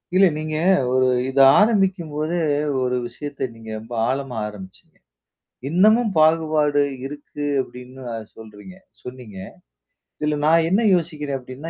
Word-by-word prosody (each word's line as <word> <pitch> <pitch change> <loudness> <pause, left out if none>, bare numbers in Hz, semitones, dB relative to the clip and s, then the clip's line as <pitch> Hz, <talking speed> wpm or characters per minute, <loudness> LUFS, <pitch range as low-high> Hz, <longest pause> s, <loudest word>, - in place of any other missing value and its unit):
இல்ல. 195 +1 +6
நீங்க 155 0 -4 0.4
ஒரு 130 0 +3 0.2
இதை 135 +1 +4 0.2
ஆரம்பிக்கும் 195 -6 +1
போதே, 155 +3 -1 0.4
ஒரு 125 0 0
விஷயத்த 140 0 -6
நீங்க 115 -1 -12
ரொம்ப 115 +2 -11 0.2
ஆழமா 135 -2 -3
ஆரம்ப்ச்சீங்க. 95 -3 -12 0.8
இன்னமும் 215 +7 +3
பாகுபாடு 155 -2 +3 0.2
இருக்கு 145 0 -7 0.2
அப்படின்னு 125 +1 -12 0.3
சொல்றீங்க 110 - -13 0.3
சொன்னீங்க. 125 -6 -10 0.8
இதில 150 0 -1
நான் 165 +1 +4
என்ன 195 +6 +2
யோசிக்கிறேன்? 150 -5 -3
அப்படின்னா, 130 +5 -9
145 Hz, 120 wpm, -21 LUFS, 125-165 Hz, 0.8 s, இல்ல